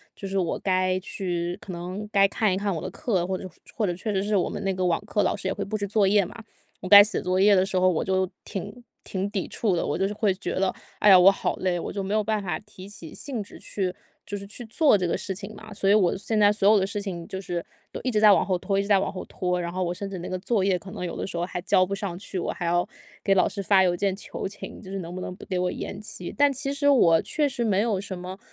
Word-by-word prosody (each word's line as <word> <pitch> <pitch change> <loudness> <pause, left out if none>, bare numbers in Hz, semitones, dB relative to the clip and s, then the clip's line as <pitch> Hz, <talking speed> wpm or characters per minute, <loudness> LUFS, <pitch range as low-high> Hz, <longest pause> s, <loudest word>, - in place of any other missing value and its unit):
就 195 - -7
是 195 0 -2
我 175 -3 0
该 185 -1 +1
去 175 -1 -3
可 190 - -8
能 180 +4 -5
该 195 0 +5
看 205 -1 +1
一 - - 0
看 200 -1 -1
我 160 - -4
的 185 - -4
课， 190 -7 -1
或 190 -1 -1
者 - - -9
说 185 - -8 0.2
或 215 - 0
者 175 - 0
确 210 +3 -3
实 190 - +1
是 210 0 0
我 185 - +1
们 - - -5
那 195 -1 0
个 185 0 -1
网 170 -2 +2
课 210 - 0
老 - - +1
师 195 -2 -5
也 190 - 0
会 200 - -4
布 215 +2 -3
置 200 -1 -3
作 205 -1 +3
业 200 -1 +4
嘛 225 +5 -10 0.4
我 185 - -5
该 205 0 +11
写 215 - -2
作 185 +1 0
业 200 +1 +6
的 185 0 +3
时 190 - -2
候， 185 - +4
我 165 - 0
就 190 0 +1 0.2
挺 240 +5 -7 0.2
挺 195 +1 -3
抵 200 -3 -3
触 200 -6 0
的。 - - -1
我 - - -1
就 195 +1 +1
是 205 - -4
会 210 -3 +2
觉 190 - -4
得： 190 0 +1 0.3
“哎 210 - +5
呀， 185 - +9
我 190 +2 +8
好 - - -2
累。” 180 -2 0
我 - - -5
就 200 - -2
没 195 +2 -3
有 215 -1 +2
办 215 -1 0
法 175 -4 -2
提 200 -3 -13
起 170 -6 -10
兴 255 -7 -5
致 - - -13
去 185 -3 -3 0.3
就 205 - -5
是 200 - -8
去 235 +3 -8
做 225 0 +4
这 180 - -1
个 - - 0
事 190 - -3
情 205 +2 -7
嘛。 215 -1 -11
所 195 - -1
以 - - +6
我 195 -4 +3
现 215 +2 -1
在 205 0 +6
所 200 -1 +2
有 215 -2 +6
的 190 - +1
事 205 0 -3
情 175 -4 -5
就 190 - -5
是， 175 -2 -4 0.3
都 - - -6
一 255 - 0
直 210 - +2
在 210 -1 +8
往 - - +3
后 185 -2 +1
拖 195 +2 -1
一 - - +3
直 200 - -5
在 200 -2 +5
往 - - -1
后 185 - -6
拖， 180 -1 -2
然 170 0 -3
后 185 +1 -2
我 175 0 -1
甚 195 +2 -5
至 190 -2 -6
那 175 - -6
个 185 - -3
作 205 0 0
业， 190 -2 +2
可 190 +2 -11
能 180 - -5
有 - - -5
的 - - -3
时 175 - -6
候 170 - -1
还 180 - -5
交 185 0 +3
不 195 - -4
上 195 -4 -3
去， 190 -1 -4
我 - - -2
还 175 - -5
要 175 +1 +1 0.4
给 195 - +3
老 185 - +4
师 200 - -4
发 190 -1 +4
邮 180 -1 +3
件 195 +1 0
求 195 - -5
情， 200 - -9
就 190 - -11
是 195 - -3
能 170 0 -7
不 185 - -5
能 180 - -5
不 - - -12
给 185 -2 -2
我 180 0 0
延 195 - -6
期。 180 -4 -7
但 285 -1 +5
其 275 +1 -2
实 285 0 0
我 170 -12 +5
确 295 -2 0
实 245 -2 -2
没 200 -1 +2
有 215 -4 0
什 195 -2 -6
么 185 +2 -7
195 Hz, 335 characters per minute, -25 LUFS, 185-205 Hz, 0.4 s, 该